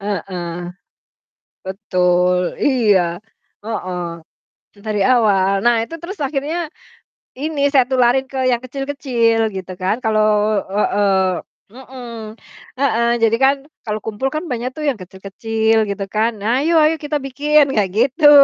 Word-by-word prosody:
Heeh. 180 Hz, -4 st, -4 dB, 1.0 s
Betul 180 Hz, -2 st, +1 dB
iya, 230 Hz, -8 st, +3 dB, 0.6 s
heeh, 185 Hz, -5 st, -4 dB, 0.8 s
dari 210 Hz, -2 st, -1 dB
awal. 200 Hz, -6 st, +3 dB
Nah 240 Hz, 0 st, +5 dB
itu 330 Hz, +8 st, -7 dB
terus 370 Hz, +4 st, -6 dB
akhirnya 300 Hz, +4 st, -2 dB, 0.6 s
ini 295 Hz, +2 st, -4 dB
saya 255 Hz, -3 st, +4 dB
tularin 260 Hz, +1 st, +3 dB
ke 270 Hz, -, -5 dB
yang 245 Hz, -2 st, +2 dB
kecil-kecil 255 Hz, -4 st, 0 dB
gitu 185 Hz, -1 st, -6 dB
kan. 190 Hz, +4 st, +1 dB
Kalau 215 Hz, -1 st, +2 dB
heeh, 200 Hz, 0 st, +1 dB, 0.6 s
mhm, 235 Hz, -4 st, -9 dB, 0.4 s
heeh. 235 Hz, -4 st, +2 dB, 0.2 s
Jadi 225 Hz, 0 st, +3 dB
kan 270 Hz, +1 st, +4 dB, 0.3 s
kalau 210 Hz, 0 st, -1 dB
kumpul 220 Hz, +4 st, -2 dB
kan 310 Hz, +4 st, -4 dB
banyak 245 Hz, +1 st, -3 dB
tuh 305 Hz, -, -4 dB
yang 250 Hz, -8 st, 0 dB
kecil-kecil 220 Hz, +4 st, -1 dB
gitu 200 Hz, 0 st, -3 dB
kan. 215 Hz, +3 st, +1 dB
Nah, 230 Hz, +6 st, +1 dB
"Ayo 330 Hz, +2 st, +2 dB
ayo 310 Hz, -, +3 dB
kita 295 Hz, 0 st, -2 dB
bikin," 290 Hz, +1 st, +3 dB
kayak 205 Hz, -4 st, +1 dB
gitu. 265 Hz, +6 st, +4 dB
225 Hz, 130 wpm, -19 LUFS, 200-270 Hz, 1.0 s, Nah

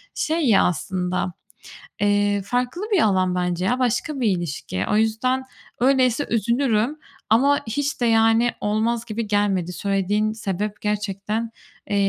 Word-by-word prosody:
şey 320 Hz, +2 st, 0 dB
ya 205 Hz, -, +5 dB
aslında, 180 Hz, 0 st, -1 dB, 0.7 s
eee, 205 Hz, 0 st, +2 dB
farklı 250 Hz, -, -2 dB
bir 385 Hz, -6 st, +4 dB
alan 185 Hz, -3 st, +2 dB
bence 180 Hz, 0 st, -1 dB
ya, 250 Hz, +6 st, +1 dB
başka 260 Hz, +4 st, 0 dB
bir 240 Hz, -, +1 dB
ilişki. 145 Hz, -, -4 dB
O 210 Hz, -, +3 dB
yüzden, 225 Hz, +4 st, +1 dB, 0.4 s
öyleyse 260 Hz, +1 st, +2 dB
üzülürüm 235 Hz, +3 st, +1 dB, 0.3 s
ama 275 Hz, +6 st, +4 dB
hiç 285 Hz, +5 st, -2 dB
de, -, -, +3 dB
yani, 225 Hz, +1 st, +4 dB
olmaz 225 Hz, +3 st, 0 dB
gibi 220 Hz, 0 st, -4 dB
gelmedi, 200 Hz, -4 st, 0 dB
söylediğin 200 Hz, +3 st, 0 dB
sebep 210 Hz, -1 st, -4 dB
gerçekten, 210 Hz, +2 st, -2 dB, 0.4 s
eee, 205 Hz, -, 0 dB
215 Hz, 135 wpm, -22 LUFS, 200-240 Hz, 0.7 s, ya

